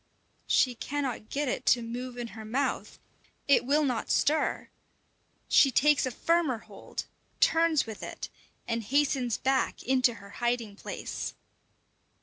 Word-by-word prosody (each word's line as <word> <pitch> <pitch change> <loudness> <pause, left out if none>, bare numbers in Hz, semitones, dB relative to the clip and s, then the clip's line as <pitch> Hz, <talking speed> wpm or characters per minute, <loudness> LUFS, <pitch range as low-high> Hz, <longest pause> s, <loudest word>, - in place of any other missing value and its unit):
She 255 - +3
cannot 260 -2 -4
get 290 +1 -1
it 250 - -2
to 240 - +4
move 245 +2 -6
in 240 -1 -4
her 220 -1 -9
mouth; 245 +6 -2 0.5
it 280 -3 +4
will 295 +2 +3
not 250 -5 -1
stir! 310 +2 +1 0.8
She 275 - +6
takes 285 +2 +3
a - - 0
firmer 330 -2 +1
hold, - - -8 0.3
turns 325 -2 +3
with 220 -2 -8
it, - - -6 0.4
and 230 0 -1
hastens 260 -1 +1
back 265 0 0
into 255 -2 +3
her 200 -2 -13
hiding 240 -4 -1
place. - - -5
255 Hz, 135 wpm, -29 LUFS, 235-285 Hz, 0.8 s, She